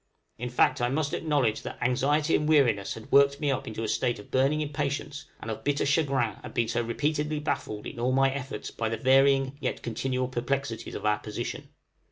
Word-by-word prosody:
In 125 +1 -3
fact, 125 - +2
I 120 - +2
must 145 +2 -1
acknowledge 140 -9 +1
that - - -7
anxiety 145 +5 +2
and 150 +1 0
weariness 120 -10 +3
had 110 - -11
worked 140 0 +5
me 145 -3 +1
up 135 - -2
into 110 0 -4
a - - -1
state 115 +2 0
of 105 - -13
burning 135 +4 +2
impatience 145 0 -3
and 115 - -5
of 110 - -6
bitter 145 0 +1
chagrin 140 - +1
at - - -9
being 115 - +2
so 120 - 0
repeatedly 150 +6 -1
baffled 105 -7 -3
in - - -7
all 125 +2 +1
my 135 +1 +3
efforts 135 -1 -5
by 110 -1 -2
the 115 - -2
varying 135 +1 +4
yet - - -3
continual 130 +2 -1
perplexities 130 -2 -3
of - - -5
our 105 0 +2
position. 105 0 -5
135 Hz, 205 wpm, -28 LUFS, 115-145 Hz, -, worked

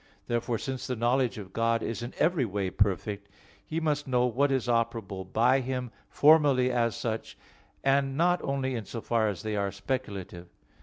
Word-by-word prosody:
Therefore, 120 0 -1
since 130 +2 -4
the 125 - -2
knowledge 120 +1 +1
of 100 -3 -9
God 115 0 +1
is 115 - -3
in 120 +1 -6
every 165 -4 +2
way 100 -4 -2
perfect, 100 +1 -1 0.3
He 160 +8 -3
must 150 -3 -1
know 125 -1 +2
what 135 +4 +1
is 130 -3 +1
operable 115 -5 -1
by 125 +4 +4
Him, 125 -2 -3 0.2
formally 145 -4 +5
as 115 -2 +1
such, 115 -1 -4 0.5
and 135 0 +2
not 175 +2 +3
only 135 -1 -1
in 115 -4 -4
so 115 - -6
far 115 -1 +1
as 95 -5 -5
they 110 -1 -2
are 100 -1 0
speculative. 100 -5 -5
120 Hz, 175 wpm, -28 LUFS, 110-135 Hz, 0.5 s, formally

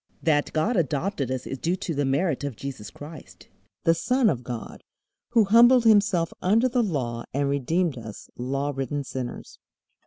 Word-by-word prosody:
That 150 -3 +2
God 205 +10 0
adopted 145 - -1
us 130 -1 -3
is 135 - -5
due 175 +2 0
to 175 -2 -4
the 145 -1 0
merit 140 +2 0
of 140 -4 -4
Jesus 130 -5 -7
Christ, 150 0 -12 0.3
the 165 - +4
Son 250 +6 +2
of 125 -4 -4
God, 120 -2 -7 0.5
who 230 -2 +6
humbled 235 +4 +6
Himself 200 -6 +3
under 220 +7 +3
the 250 0 +1
Law 125 - -2
and 140 0 +1
redeemed 140 +2 0
us 110 -2 -10
law 135 +3 -2
ridden 135 +2 -3
sinners. 130 -2 -7
145 Hz, 165 wpm, -25 LUFS, 135-190 Hz, 0.5 s, who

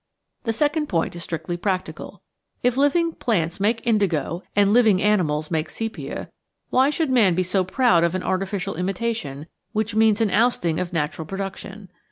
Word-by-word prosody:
The 225 - +1
second 300 +4 0
point 165 -2 0
is 170 - -6
strictly 165 +1 -4
practical. 185 0 -4 0.4
If 245 0 +2
living 310 +5 +2
plants 175 - -1
make 225 +4 0
indigo 185 -7 +1
and 200 0 +4
living 220 -6 +5
animals 170 -7 +1
make 160 -1 -1
sepia, 225 0 -5 0.4
why 260 +2 +4
should 300 -2 -1
man 215 -9 +4
be 185 - +1
so 185 +1 +1
proud 185 -2 +3
of 170 +1 +1
an 185 - -2
artificial 195 +1 -2
imitation, 180 -5 -3 0.3
which 215 0 -1
means 220 0 +4
an 220 -3 +1
ousting 210 -9 +2
of 180 -1 -3
natural 160 -1 -2
pro 195 - -5
duction? 195 +1 -7
195 Hz, 170 wpm, -23 LUFS, 175-225 Hz, 0.4 s, living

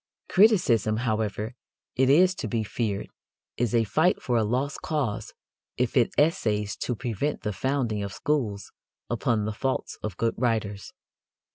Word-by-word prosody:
Criticism, 170 - +4
however, 110 -1 -1 0.4
it 130 0 +3
is 180 +6 +6
to 145 - -5
be 110 0 -1
feared, 105 -1 -2 0.5
is 120 -1 0
a 115 - +4
fight 155 - +2
for 125 - -1
a 115 - +3
lost 130 +6 -1
cause 140 -10 -2 0.5
if 125 -1 0
it 125 -4 +4
essays 110 - +1
to 125 - -2
prevent 125 +5 -2
the 105 -2 -2
founding 120 0 -1
of 100 -1 -4
schools 115 -7 -2 0.4
upon 110 -3 +1
the 110 - -2
faults 130 +5 -2
of 105 -4 -5
good 115 0 +1
writers. 110 -5 -1
115 Hz, 150 wpm, -26 LUFS, 105-135 Hz, 0.5 s, is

